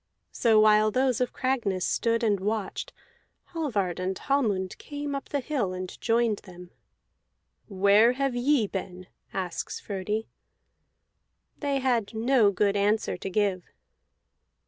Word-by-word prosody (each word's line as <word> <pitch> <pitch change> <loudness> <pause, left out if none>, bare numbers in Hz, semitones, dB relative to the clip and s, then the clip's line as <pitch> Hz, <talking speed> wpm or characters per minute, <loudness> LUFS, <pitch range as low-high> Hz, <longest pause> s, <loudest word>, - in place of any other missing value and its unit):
So 225 -3 +3
while 215 0 +5
those 255 +2 +1
of 250 - 0
Cragness 230 -9 -1
stood 230 0 0
and 205 -3 +2
watched, 210 0 -3 0.6
Hallvard 215 - -1
and 185 +1 -2
Hallmund 210 -10 0
came 290 -1 -5
up 275 - -5
the 285 - -1
hill 250 -9 -2
and 185 0 -7
joined 230 -2 +1
them. 180 -1 -13 1.0
"Where 200 +4 +4
have 275 0 -1
ye 250 -1 +2
been?" 185 -2 -6 0.3
asks 185 -3 -4
Frodi. 210 +2 -3 1.3
They 285 -2 0
had 235 -4 0
no 230 -1 +4
good 200 +1 +1
answer 205 +2 +1
to - - -5
give. 190 -2 0
215 Hz, 125 wpm, -27 LUFS, 195-250 Hz, 1.3 s, while